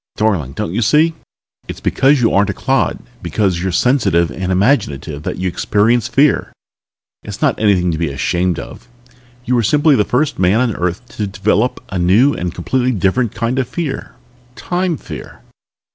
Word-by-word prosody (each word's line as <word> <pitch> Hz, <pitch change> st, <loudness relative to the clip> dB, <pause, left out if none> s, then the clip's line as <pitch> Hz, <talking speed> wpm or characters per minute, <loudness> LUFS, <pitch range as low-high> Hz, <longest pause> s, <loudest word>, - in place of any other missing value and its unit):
Darling, 95 Hz, -11 st, 0 dB
don't 80 Hz, -, -4 dB
you 115 Hz, -, 0 dB
see 155 Hz, +8 st, +3 dB, 0.5 s
it's -, -, -7 dB
because 135 Hz, 0 st, +2 dB
you 115 Hz, -, +2 dB
aren't 100 Hz, +1 st, +3 dB
a 100 Hz, -, -3 dB
clod, 135 Hz, 0 st, 0 dB, 0.2 s
because 95 Hz, -5 st, -1 dB
you're 95 Hz, 0 st, -1 dB
sensitive 90 Hz, -, +2 dB
and 95 Hz, 0 st, -3 dB
imaginative 85 Hz, -, 0 dB
that -, -, -4 dB
you 95 Hz, +1 st, -2 dB
experience 110 Hz, +6 st, +1 dB
fear. 140 Hz, +3 st, +2 dB, 0.7 s
It's -, -, -8 dB
not -, -, +2 dB
anything 95 Hz, -5 st, +2 dB
to 80 Hz, -, -3 dB
be 85 Hz, -2 st, -1 dB
ashamed 85 Hz, +5 st, -1 dB
of. -, -, -9 dB, 0.6 s
You 125 Hz, -, 0 dB
were 120 Hz, -, +3 dB
simply 145 Hz, +6 st, +3 dB
the 105 Hz, -, +3 dB
first 145 Hz, +7 st, -1 dB
man 95 Hz, +4 st, +3 dB
on 125 Hz, -4 st, 0 dB
Earth 90 Hz, +7 st, -3 dB
to 105 Hz, -, -1 dB
develop 105 Hz, +4 st, 0 dB
a 95 Hz, -, -3 dB
new 105 Hz, +11 st, +4 dB
and 90 Hz, 0 st, -3 dB
completely 130 Hz, +6 st, -1 dB
different 105 Hz, +3 st, 0 dB
kind 120 Hz, +3 st, -1 dB
of 125 Hz, -2 st, -2 dB
fear 150 Hz, -2 st, -5 dB, 0.4 s
Time 180 Hz, 0 st, -2 dB
Fear." -, -, -10 dB
105 Hz, 175 wpm, -16 LUFS, 90-130 Hz, 0.7 s, new